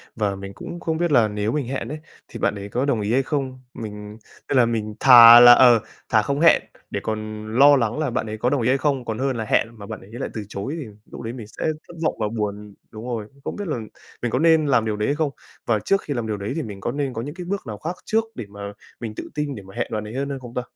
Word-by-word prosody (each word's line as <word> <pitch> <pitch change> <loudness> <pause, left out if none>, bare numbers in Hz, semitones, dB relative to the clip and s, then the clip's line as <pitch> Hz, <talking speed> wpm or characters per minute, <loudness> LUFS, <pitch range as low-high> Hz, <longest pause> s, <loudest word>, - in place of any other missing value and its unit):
và 105 -3 -1
mình 100 0 -8
cũng 170 +11 -8
không 160 -1 -2
biết 170 -2 0
là 120 -5 +5
nếu 105 +1 -2
mình 140 -2 -2
hẹn 130 -3 -3
ấy, 150 +2 -5 0.3
thì - - -9
bạn - - +1
ấy 100 0 -7
có 125 +6 -1
đồng 120 -6 0
ý 105 +2 -1
hay 135 +2 +3
không? 130 -3 -3
Mình 105 -1 -8 0.3
nên 140 - +2
là 125 - +6
mình 110 -2 -2
thà 120 -2 +10
là, 120 0 +10
ờ, 120 -2 +7 0.3
thà 110 -2 +4
không 140 +6 -2
hẹn 165 +1 +6 0.3
để - - -3
còn 110 0 -4
lo 145 +1 +8
lắng 120 +2 0
là 150 -4 0
bạn 120 -1 -2
ấy 110 0 -5
có 125 +3 +1
đồng 140 -3 0
ý 115 - 0
hay 135 - +3
không, 135 -2 -1
còn 110 0 -4
hơn 135 -2 -1
là 110 - -3
hẹn 110 - +2
mà 100 - -9
bạn - - -7
ấy 95 - -15
lại 120 +3 -5
từ 110 - -5
chối 115 +10 -4
thì 145 - -5 0.3
lúc - - -8
đấy 115 +1 -5
mình 115 -5 -8
sẽ - - -6 0.2
thất - - -12
vọng 155 - +1
và 105 - 0
buồn 105 -1 -4 0.2
đúng 110 +1 -9
rồi, 115 -4 -4 0.2
không - - -4
biết 205 -2 -5
là 150 - -2 0.4
mình 120 - -1
có 125 - +1
nên 160 -1 +4
làm 120 -5 +3
điều 110 -1 -1
đấy 105 - -1
hay 145 - +1
không? 155 -1 0 0.4
Và 110 -2 +1
trước 195 - +1
khi 145 - -4
làm 120 -4 -3
điều 105 -1 -2
đấy 100 +5 -4
thì 160 - -1
mình 100 -4 -8
có - - -2
nên 140 -2 -2
có 115 - -4
những 145 +6 -7
cái 180 -1 -7
bước 200 +2 -2
nào 105 -2 -5
khác 170 - -4
trước 225 +1 +2
để 110 - -6
mà 100 0 -7 0.3
mình 115 -2 -5
tự - - -7
tin 150 -2 -2
để 100 - -9
mà 95 0 -14
hẹn - - -1
bạn 105 -1 -2
ấy 110 - -8
hơn 140 +1 -2
hay 140 -1 -4
không 120 -2 -11
ta? 125 - -1
120 Hz, 300 wpm, -22 LUFS, 105-140 Hz, 0.4 s, thà